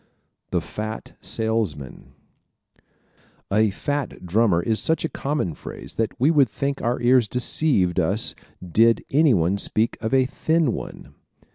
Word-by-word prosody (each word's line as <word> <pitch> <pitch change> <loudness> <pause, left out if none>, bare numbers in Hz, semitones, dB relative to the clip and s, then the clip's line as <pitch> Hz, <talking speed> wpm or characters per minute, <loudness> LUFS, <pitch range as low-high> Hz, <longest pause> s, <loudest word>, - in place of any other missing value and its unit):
The - - 0
Fat 110 +1 -7
Salesman 110 - -3 0.7
¶ - - -37 0.7
"A 110 0 +4
fat 145 +1 -4
drummer" 95 -2 +2
is 110 -1 +1
such 160 0 0
a - - -2
common 140 - -2
phrase - - -9
that 115 +2 -2
we 140 +6 +4
would 140 -6 +4
think 140 +4 -3
our 120 +1 -1
ears 120 -1 +4
deceived 120 - +2
us 100 +6 +1 0.3
did 115 +6 +3
anyone 100 - +3
speak 110 +3 0
of 110 - -2
a 130 -1 +4
thin 155 +1 0
one. - - -8
115 Hz, 140 wpm, -23 LUFS, 100-135 Hz, 0.7 s, A